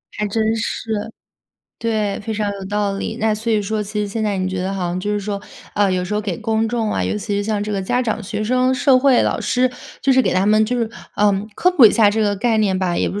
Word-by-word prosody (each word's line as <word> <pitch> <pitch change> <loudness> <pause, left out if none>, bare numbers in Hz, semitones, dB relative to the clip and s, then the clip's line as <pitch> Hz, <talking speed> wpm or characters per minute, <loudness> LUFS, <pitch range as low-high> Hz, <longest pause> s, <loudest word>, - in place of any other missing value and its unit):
还 210 - -1
真 220 +2 0
是。 225 0 -4 0.9
对， 215 -3 -1
非 220 - -4
常 210 -1 -1
有 195 -1 -7
道 205 0 -1
理， 220 +3 -4
那 220 -1 +2
所 225 +2 -2
以 215 - +2
说 215 +1 -2
其 210 +1 -4
实 210 - -1
现 220 +2 -2
在 205 -2 -1
你 185 0 -1
觉 185 -1 -3
得 190 +1 -2
好 190 -2 -3
像 175 +1 -2
就 205 +3 -3
是 205 - -1
说， 200 0 -3 0.4
呃， 205 -2 +2
有 180 -1 0
时 185 +3 -3
候 210 - +1
给 195 -4 -2
公 220 0 0
众 225 -1 -1
啊， - - -1
尤 210 - -1
其 205 0 -3
是 205 - 0
像 210 -1 -1
这 210 - -4
个 195 -2 -1
家 245 +6 0
长、 225 -3 -2
学 210 +2 -4
生、 255 +3 +2
社 255 0 +4
会、 260 -2 +4
老 - - 0
师， 255 0 +1 0.3
就 275 - +1
是 260 0 +5
给 - - 0
他 185 +2 +2
们 215 +1 +4
就 245 +3 -1
是， 230 -2 0 0.3
呃， 205 0 +4 0.2
科 360 - +3
普 285 -10 +6
一 215 - +9
下 215 -1 +4
这 220 +1 +1
个 205 -1 +1
概 225 +3 +1
念 200 -3 +1
吧， 180 -2 0
也 - - +1
不 205 - -4
210 Hz, 300 characters per minute, -19 LUFS, 200-225 Hz, 0.9 s, 一